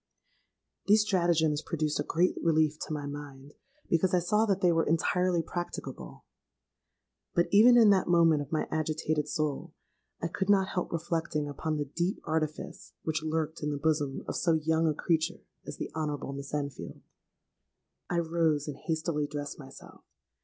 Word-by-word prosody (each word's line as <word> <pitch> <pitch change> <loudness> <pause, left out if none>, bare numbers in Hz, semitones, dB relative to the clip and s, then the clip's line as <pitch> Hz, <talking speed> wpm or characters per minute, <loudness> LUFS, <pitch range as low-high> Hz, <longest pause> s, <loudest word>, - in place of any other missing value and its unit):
'—These 210 +1 +6
stratagems 170 -6 +2
produced 155 -3 -2
a - - +1
great 180 +3 +1
relief 155 -2 +2
to - - -6
my 150 -2 -3
mind, 145 -1 -8 0.3
because 175 +2 +2
I - - +4
saw 210 +6 +2
that 195 -2 +1
they 180 -3 +4
were 165 -1 +2
entirely 175 +2 +1
practicable. 175 +2 -6 1.1
But, 170 - +3
even 235 +4 +7
in 220 -3 +7
that 190 -2 +2
moment 165 -3 +4
of 140 - -8
my 155 - 0
agitated 155 -1 -1
soul, 150 -1 -2 0.4
I - - -2
could 190 +3 -3
not 195 -2 +4
help 180 - -3
reflecting 165 -2 -2
upon 155 +2 -3
the 145 - -1
deep 170 +7 -2
artifice 155 -1 -3
which 155 -1 -1
lurked 160 0 -2
in 150 - -1
the 145 - -2
bosom 145 -2 0
of - - -3
so 170 - +2
young 160 +1 +1
a 155 - +1
creature 160 0 -1 0.2
as - - -6
the - - -5
Honourable 150 -3 -3
Miss 140 0 -7
Enfield. 145 -1 -5 1.1
"I 175 - 0
rose 160 -3 +1
and 145 -2 -5
hastily 160 -2 -2
dressed 145 0 -6
myself. 135 -2 -13
160 Hz, 165 wpm, -29 LUFS, 150-170 Hz, 1.1 s, even